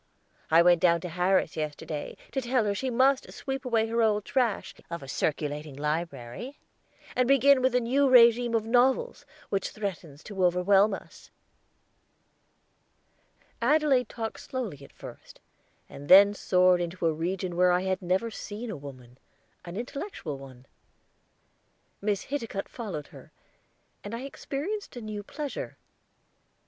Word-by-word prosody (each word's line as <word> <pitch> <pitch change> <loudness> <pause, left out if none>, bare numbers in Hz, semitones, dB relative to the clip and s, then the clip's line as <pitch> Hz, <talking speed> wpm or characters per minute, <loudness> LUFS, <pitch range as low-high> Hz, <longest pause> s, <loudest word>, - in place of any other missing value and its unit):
I 165 +2 +6
went 175 -1 +5
down 170 -1 +4
to 180 - -5
Harris 180 0 +1
yesterday 150 0 -5
to 270 - -1
tell 245 -2 +1
her 205 - +1
she 260 +6 -2
must 260 +2 +2
sweep 270 -1 -5
away 230 -3 +2
her 230 +1 0
old 210 -2 +2
trash 245 -6 0 0.2
of 170 -3 -6
a - - -9
circulating 150 0 -2
library, 150 - -4 0.6
and 255 -1 +2
begin 275 0 +5
with 260 -1 +2
the 250 - +4
New 270 +4 +2
Regime 235 -1 +6
of 220 -1 0
Novels, 255 - +1 0.2
which 195 -1 -1
threatens 175 -8 -6
to 195 -3 -3
overwhelm 195 +3 +4
us." - - -14 2.3
Adelaide 270 -2 +3
talked 225 -1 -5
slowly 215 - -5
at - - -14
first, - - -12 0.5
and 145 +1 -11
then 200 +2 +9
soared 180 -2 +3
into 175 0 -3
a 165 - +3
region 175 +2 -3
where 180 +1 +4
I 180 0 +2
had 190 0 -1
never 190 +6 0
seen 215 +2 -6
a - - -5
woman 130 -3 -12 0.5
an 175 +2 -7
intellectual 240 - -5
one. 130 -2 -13 1.4
Miss 205 -1 -1
Hiticutt 230 -8 -4
followed 195 - -6
her, - - -14 0.7
and 205 +3 -5
I 235 - -6
experienced 295 +9 -5
a 245 - -6
new 215 -1 -5
pleasure. 290 +7 -6
205 Hz, 145 wpm, -28 LUFS, 170-245 Hz, 2.3 s, then